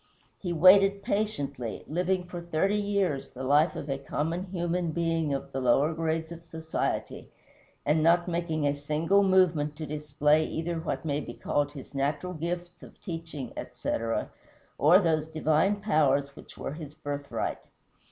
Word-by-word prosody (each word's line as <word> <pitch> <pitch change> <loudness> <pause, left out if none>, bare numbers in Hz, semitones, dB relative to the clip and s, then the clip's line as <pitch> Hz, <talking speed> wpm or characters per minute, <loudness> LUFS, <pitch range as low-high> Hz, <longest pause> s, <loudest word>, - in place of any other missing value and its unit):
He 180 - -3
waited 195 +4 +6
patiently, 140 - -2
living 180 +3 0
for 175 -1 -7
thirty 170 +4 0
years 200 -8 0
the 130 - -8
life 145 +5 +3
of 140 - -5
a 135 -1 -2
common 165 +6 -2
human 175 -1 -1
being 165 -2 0
of 135 -1 -3
the 135 - -3
lower 135 +5 +3
grades 160 0 -2
of 170 0 -9
society, 160 -1 -3 0.6
and 150 +2 +3
not 170 +2 +4
making 165 -3 -1
a 145 0 +2
single 155 +7 +2
movement 175 -6 +3
to 155 +1 -5
display 150 +1 +2
either 165 +1 -3
what 160 0 -3
may 145 -2 0
be - - -7
called 145 0 -1
his 140 -1 -10
natural 145 +6 -1
gifts, 175 +1 -4
of - - -14
teaching, 165 - -6
etc., 115 0 -3 0.5
or 160 +6 +7
those 160 -5 +1
divine 160 +6 +1
powers 140 -8 +2
which - - -13
were - - -4
his 150 -2 -9
birthright. 145 -2 -3
160 Hz, 155 wpm, -28 LUFS, 145-175 Hz, 0.6 s, or